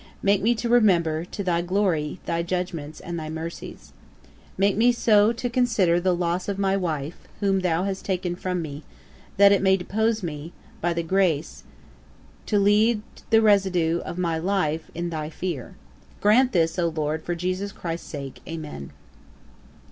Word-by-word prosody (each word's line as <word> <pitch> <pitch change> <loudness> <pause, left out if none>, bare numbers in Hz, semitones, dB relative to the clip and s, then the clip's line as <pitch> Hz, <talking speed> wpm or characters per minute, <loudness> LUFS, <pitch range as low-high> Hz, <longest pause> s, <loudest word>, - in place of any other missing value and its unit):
Make 200 0 +3
me 235 +3 +3
to 235 +2 -3
remember, 175 -9 +3
to 200 - -6
thy 175 -2 +1
glory, 175 -4 0
thy 170 0 -1
judgements 170 -4 -4
and 170 -1 -5
thy 155 -1 -6
mercies. 160 +1 -7 0.6
Make 195 +1 +3
me 235 +4 +4
so 220 -2 +4
to 240 +1 -3
consider 230 -8 +2
the 185 0 +2
loss 175 +2 -1
of 200 - -2
my 195 -1 +1
wife, 160 -5 -3
whom 195 -1 +2
thou 180 -1 0
hast 195 -1 -3
taken 180 -2 -2
from 180 -1 -3
me, 145 -1 -7 0.6
that 200 0 +7
it 200 - +4
may 190 0 +4
dispose 220 +4 -1
me, 160 0 -6 0.3
by 175 - +1
thy 170 0 -2
grace, 165 -3 0 0.8
to 210 - +2
lead 210 +2 +3 0.3
the 225 0 +5
residue 185 -5 +3
of 170 - -7
my 170 -3 0
life 165 -3 -1
in 170 +1 -3
thy 155 -2 -4
fear. 165 -6 -5 0.4
Grant 245 +5 +4
this, 165 -2 +1
O 170 - +2
LORD, 155 0 -2
for 175 - -2
JESUS 185 +3 -2
CHRIST'S 170 -2 -6
sake. 140 -3 -7
Amen.' 155 - -7
180 Hz, 165 wpm, -24 LUFS, 165-200 Hz, 0.8 s, that